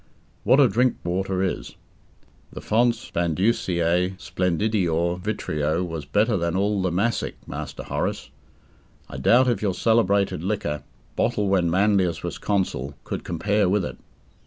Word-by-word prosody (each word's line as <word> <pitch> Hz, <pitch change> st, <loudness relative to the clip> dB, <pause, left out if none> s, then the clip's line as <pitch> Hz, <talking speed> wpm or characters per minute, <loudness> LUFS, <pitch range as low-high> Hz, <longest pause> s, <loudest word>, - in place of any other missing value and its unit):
What 135 Hz, -, +5 dB
a 140 Hz, -, +7 dB
drink 125 Hz, +4 st, +2 dB
water 95 Hz, +2 st, -1 dB
is! -, -, -3 dB, 0.8 s
The -, -, -8 dB
fons 120 Hz, +1 st, +1 dB
Bandusiae 90 Hz, 0 st, +1 dB
splendidior 90 Hz, -2 st, 0 dB
vitreo 85 Hz, -5 st, -1 dB
was 80 Hz, -3 st, -5 dB
better 105 Hz, +1 st, +2 dB
than 85 Hz, 0 st, -1 dB
all 100 Hz, +1 st, +1 dB
the 95 Hz, -1 st, 0 dB
Massic, 105 Hz, +6 st, -1 dB
Master -, -, -6 dB
Horace! -, -, -3 dB, 0.8 s
I -, -, -7 dB
doubt 120 Hz, -, +4 dB
if 120 Hz, -, +1 dB
your 100 Hz, -4 st, 0 dB
celebrated 100 Hz, -6 st, +2 dB
liquor, 90 Hz, -7 st, -2 dB, 0.3 s
bottled 100 Hz, -2 st, 0 dB
when 90 Hz, -3 st, +2 dB
Manlius 95 Hz, -1 st, +2 dB
was -, -, -4 dB
consul, 75 Hz, -9 st, -1 dB
could -, -, -5 dB
compare 100 Hz, +3 st, +1 dB
with 100 Hz, -1 st, +1 dB
it. -, -, -7 dB
95 Hz, 135 wpm, -24 LUFS, 85-105 Hz, 0.8 s, a